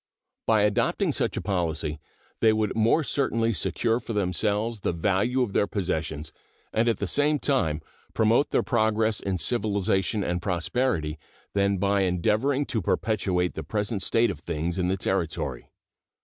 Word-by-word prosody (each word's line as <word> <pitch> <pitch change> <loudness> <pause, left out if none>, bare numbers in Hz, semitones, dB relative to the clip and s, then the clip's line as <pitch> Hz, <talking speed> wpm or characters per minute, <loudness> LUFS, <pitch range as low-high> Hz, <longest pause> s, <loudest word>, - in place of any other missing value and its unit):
By 110 -2 +4
adopting 105 -1 +1
such - - -1
a - - -1
policy 80 -5 -2 0.4
they 110 - +5
would 110 -1 0
more 115 +8 +3
certainly 115 -5 0
secure 115 +6 0
for 115 - -6
themselves 105 +3 0
the 90 - -1
value 100 +9 +1
of 105 -5 -4
their 100 - +2
possessions, 80 -6 -3 0.4
and 115 +2 +2
at 115 - +1
the 100 - -2
same 145 +8 +2
time 80 - +1 0.3
promote 115 +5 +3
their - - +1
progress 110 -2 +1
in 95 -2 -2
civilization 100 -2 +1
and 90 -1 -1
prosperity, 85 - -1 0.3
than 100 0 +2
by 100 +1 +2
endeavoring 105 +10 +1
to 115 -5 -2
perpetuate 90 -2 0
the - - -5
present 105 +5 -2
state 115 +3 +3
of 85 - -8
things 85 +3 -3
in 90 - +1
the 95 +1 0
Territory. 90 -4 -2
100 Hz, 155 wpm, -26 LUFS, 90-115 Hz, 0.4 s, they